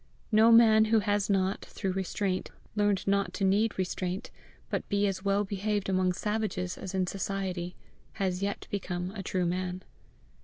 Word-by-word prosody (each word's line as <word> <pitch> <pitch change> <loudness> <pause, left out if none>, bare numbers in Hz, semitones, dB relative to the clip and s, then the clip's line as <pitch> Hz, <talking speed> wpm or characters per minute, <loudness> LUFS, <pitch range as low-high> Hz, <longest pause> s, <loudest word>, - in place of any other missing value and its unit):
No 220 +2 +6
man 220 -1 +7
who 225 +1 +3
has 205 -1 0
not, 195 -1 +1
through 190 - -3
restraint, 190 0 -2 0.3
learned 205 -2 +1
not 200 0 +1
to 195 - -2
need 205 +3 +2
restraint, 185 +2 -3 0.4
but - - -2
be 200 0 +2
as 190 -1 -2
well 200 +1 +2
behaved 205 0 -2
among 185 -1 +2
savages 210 -3 -2
as 190 0 -6
in 185 -1 +2
society, 185 -2 -3 0.4
has 185 -2 -1
yet 200 0 -3
become 180 -2 -3
a 200 -1 -6
true 185 -1 -1
man. 180 +1 -2
195 Hz, 160 wpm, -29 LUFS, 185-205 Hz, 0.4 s, man